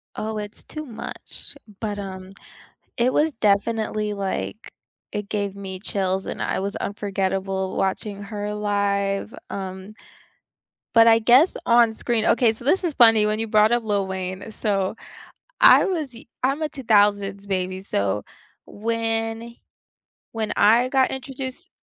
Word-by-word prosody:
Oh, 215 0 -3
it's 210 0 -6
too 305 0 -7
much. 230 -5 -7 0.2
But, 210 -2 -3
um, 190 -1 -7 0.7
it 245 +2 +2
was 315 +1 +2
definitely, 215 -1 0
like 200 +2 -4 0.4
it 210 -1 -5
gave 200 -2 -2
me 190 -2 -7
chills 190 -2 -1
and - - -4
I - - -1
was 200 +1 -3
unforgettable 195 -2 -2
watching 200 +1 -2
her 205 0 -4
live. 200 0 -1
Um, 190 +1 -6 1.0
but 230 0 +7
I 225 0 +7
guess 250 +9 +5
on 235 -1 +5
screen 225 0 0
okay, 235 -2 +4
so 225 +2 -10
this 370 +8 +2
is 330 -4 0
funny 225 -4 +6
when 215 0 0
you 225 - -2
brought 215 +1 +4
up 240 -1 +1
Lil 205 -2 0
Wayne. 190 +2 -5
So 200 -3 -1 0.7
I - - +8
was 320 -8 -2
y 230 - -12 0.2
I'm 275 +4 +1
a 305 - -1
2000s 205 -6 +2
baby, 185 -1 -2
so 100 - -1 0.4
when, 225 +1 -2 0.8
when 220 -2 -2
I 230 +5 +5
got 265 -1 +2
introduced 265 0 -6
210 Hz, 145 wpm, -23 LUFS, 195-230 Hz, 1.0 s, I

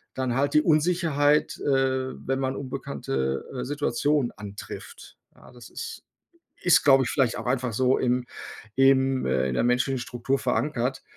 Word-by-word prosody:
dann 130 -2 -1
halt 140 +2 +1
die 150 - +6
Unsicherheit, 155 -2 +2
äh, 130 -1 0 0.2
wenn 135 0 0
man 130 0 -1
unbekannte, 70 - -3
äh, 125 - -3
Situationen 145 -1 0
antrifft. 100 -1 -10 0.2
Ja, - - -17
das 120 -1 -13
ist - - -7 0.6
ist 180 - +4
glaube 135 -2 +6
ich - - -2
vielleicht 130 -5 +1
auch - - -6
einfach 125 -1 0
so 130 +3 +2
im 125 0 0 0.5
im 135 0 +3
äh, 65 0 +1
in - - -2
der - - +1
menschlichen 125 +2 +1
Struktur 125 +2 -2
verankert. 125 +3 -1
130 Hz, 155 wpm, -25 LUFS, 120-140 Hz, 0.6 s, die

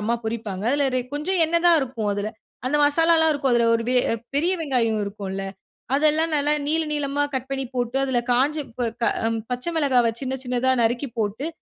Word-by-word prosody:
அம்மா 225 +3 0
பொரிப்பாங்க. 215 -3 -4
இல்ல 285 -1 +2
இதில 255 -1 -2
கொஞ்சம் 350 +6 -1
எண்ணெய் 335 +2 0
தான் 335 -2 +6
இருக்கும் 235 -6 -2
அதுல. 205 +1 -2 0.4
அந்த 295 +3 +1
மசாலாலாம் 320 +2 +4
இருக்கும். 275 -3 0
அதில 235 -1 +3
ஒரு 230 - 0
வே 255 - +1 0.4
பெரிய 340 +6 +2
வெங்காயம் 235 -7 0
இருக்கும்ல. 195 -1 -5 0.5
அதெல்லாம் 310 +2 +2
நல்லா 295 +1 +1
நீள, 320 +2 +1
நீளமா 290 -1 -1
கட் 260 0 -3
பண்ணி 270 0 -2
போட்டு. 245 +1 -1
அதில 260 -2 0
காஞ்ச 275 +5 +2 0.2
ப 240 -2 0
க - - +4 0.2
அ - - +3 0.2
பச்ச 250 +4 -3
மிளகாவ 255 -6 +3
சின்ன, 265 0 -3
சின்னதா 250 +1 0
நறுக்கி 240 +4 0
போட்டு, 220 +7 -2
260 Hz, 185 wpm, -23 LUFS, 235-295 Hz, 0.5 s, தான்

